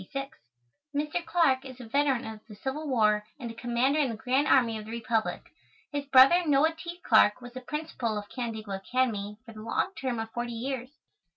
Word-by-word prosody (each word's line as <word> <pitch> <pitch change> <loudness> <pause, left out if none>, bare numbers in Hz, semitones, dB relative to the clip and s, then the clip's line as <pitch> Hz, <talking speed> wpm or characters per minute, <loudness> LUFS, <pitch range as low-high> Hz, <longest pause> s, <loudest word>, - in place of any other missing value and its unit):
Mr. 300 +4 -1
Clarke 325 -7 +2
is 260 -2 -10
a 245 - -8
veteran 275 +1 +1
of 220 -1 -7
the 210 - -11
Civil 270 +8 -4
War 210 -5 +3 0.2
and 235 -4 -5
a - - -9
Commander 240 +5 +1
in 280 -4 +2
the 230 - -3
Grand 260 +6 +1
Army 235 -4 +4
of 210 - -9
the - - -10
Republic. 230 -1 -1 0.5
His 285 -1 -3
brother, 275 +6 +7
Noah 305 +1 +3
T. 340 +2 -8
Clarke, 215 -1 +5
was 245 -1 -11
the 255 - -7
Principal 255 -6 -3
of 205 0 -5
Canandaigua 220 -5 -4
Academy 210 -2 -1
for 230 - -11
the 215 - -10
long 230 - -1
term 255 -7 -3
of 225 0 -4
forty 240 0 -3
years. 255 +1 -4
250 Hz, 195 wpm, -28 LUFS, 225-280 Hz, 0.5 s, brother